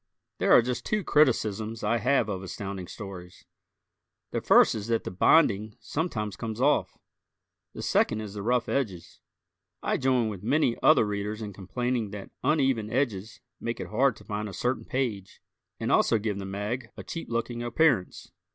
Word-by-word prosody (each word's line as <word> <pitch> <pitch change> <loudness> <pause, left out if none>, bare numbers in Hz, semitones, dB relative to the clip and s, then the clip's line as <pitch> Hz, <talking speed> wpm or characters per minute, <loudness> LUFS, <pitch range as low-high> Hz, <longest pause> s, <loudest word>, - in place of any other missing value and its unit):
There - - +2
are 120 - +8
just 125 +1 -3
two 210 -2 -1
criticisms 115 - +1
I 110 +3 +2
have 125 0 +2
of 95 -3 -3
Astounding 95 -1 -6
Stories. 95 -4 -9 0.9
The - - -2
first - - +6
is 105 -1 -5
that 115 -1 0
the - - -5
binding 105 - +3
sometimes 110 - -3
comes 110 -1 -5
off; 145 +3 +2 0.8
the - - -7
second 110 - +2
is 105 -2 -7
the 105 - -5
rough 120 +3 +1
edges. 100 -11 -3 0.6
I - - +1
join 130 -3 +2
with 100 -4 -5
many 125 +2 +2
other - - +6
Readers 105 +1 -3
in 105 -1 -6
complaining 110 +4 -2
that 100 -1 -8
uneven 135 -7 +2
edges 110 -5 -2 0.2
make 115 0 -4
it - - -5
hard 125 +3 +2
to - - -15
find 105 0 -4
a - - -9
certain 125 +7 -1
page 110 -8 -3 0.4
and - - -1
also 115 - +4
give 105 -2 -2
the 95 - -5
mag 105 +5 -4
a - - -7
cheap 165 - -6
looking 120 0 -2
appearance. 120 - +1
110 Hz, 170 wpm, -27 LUFS, 100-125 Hz, 0.9 s, are